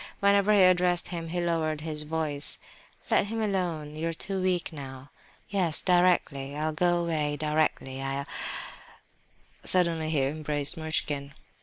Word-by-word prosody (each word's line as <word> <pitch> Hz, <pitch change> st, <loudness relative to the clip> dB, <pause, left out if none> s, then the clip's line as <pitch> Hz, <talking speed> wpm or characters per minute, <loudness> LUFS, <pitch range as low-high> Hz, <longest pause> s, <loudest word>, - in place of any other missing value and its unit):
Whenever 200 Hz, +1 st, +3 dB
he 205 Hz, -2 st, +6 dB
addressed 180 Hz, -1 st, +3 dB
him 170 Hz, -2 st, -5 dB
he 175 Hz, +2 st, -3 dB
lowered 160 Hz, -3 st, -1 dB
his 155 Hz, -1 st, -4 dB
voice. 150 Hz, -2 st, +3 dB, 0.5 s
"Let 200 Hz, -, +3 dB
them 225 Hz, +1 st, -3 dB
alone, 175 Hz, -8 st, -2 dB
you're 165 Hz, +1 st, -3 dB
too 195 Hz, +3 st, -4 dB
weak 180 Hz, -3 st, -1 dB
now—" 135 Hz, -2 st, -9 dB, 0.4 s
"Yes, 180 Hz, -6 st, +2 dB
directly; 175 Hz, -6 st, +2 dB
I'll 155 Hz, +1 st, -1 dB
go 175 Hz, +2 st, +2 dB
away 155 Hz, -3 st, -1 dB
directly. 150 Hz, -3 st, -1 dB
I'll—" 135 Hz, +1 st, -3 dB, 1.4 s
Suddenly 170 Hz, -3 st, +2 dB
he 150 Hz, -4 st, +1 dB
embraced 145 Hz, 0 st, -2 dB
Muishkin. 150 Hz, -3 st, -3 dB
160 Hz, 135 wpm, -27 LUFS, 150-180 Hz, 1.4 s, he